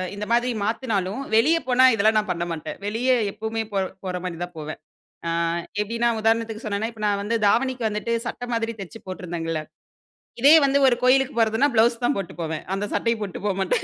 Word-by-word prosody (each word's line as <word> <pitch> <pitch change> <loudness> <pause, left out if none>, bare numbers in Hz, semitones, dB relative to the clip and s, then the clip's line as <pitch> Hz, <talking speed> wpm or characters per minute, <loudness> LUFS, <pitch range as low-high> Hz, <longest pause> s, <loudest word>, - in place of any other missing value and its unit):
இந்த 210 +1 -4
மாரி 240 +1 +3 0.2
மாத்துனாலும், 220 -1 -1
வெளிய 305 +9 +5
போனா 255 +1 +5
இதெல்லாம் 215 0 +3
நான் 210 -3 -4
பண்ண 170 0 -2
மாட்டேன். 160 -1 -5
வெளியே 245 +5 +2 0.2
எப்பவுமே 220 +1 -3
போற 195 -1 +1 0.2
போற 185 -1 -3
மாரி 175 -2 -4
தான் 175 0 -7
போவேன். 155 0 -6 0.5
அ - - 0 0.5
எப்படின்னா 230 +3 0
உதாரணத்துக்கு 225 0 0
சொன்னேன்னா, 215 +2 -1
இப்ப 215 -2 -9
நான் 200 -1 0
வந்து 230 +2 0
தாவணிக்கு 245 +1 +1
வந்துட்டு 210 +3 -2
சட்டை 245 0 -5
மாரி 230 0 -1
தச்சு 195 +4 -9
போட்டிருந்தேங்கல்ல. 170 -4 -4 0.8
இதே 285 +3 +8
வந்து 280 +1 +3
ஒரு 240 - +4
கோவிலுக்கு 265 0 +3
போவதுன்னா, 225 +6 +3
ப்ளவுஸ் 235 +2 +3
தான் 285 - +2
போட்டு 195 - -5
போவேன். 160 -1 -3
அந்த 205 +1 -2
சட்டை 230 0 +1
போட்டுட்டு 200 0 -5
போ 200 - +1
மாட்டேன். 190 - 0
220 Hz, 185 wpm, -23 LUFS, 195-235 Hz, 0.8 s, இதே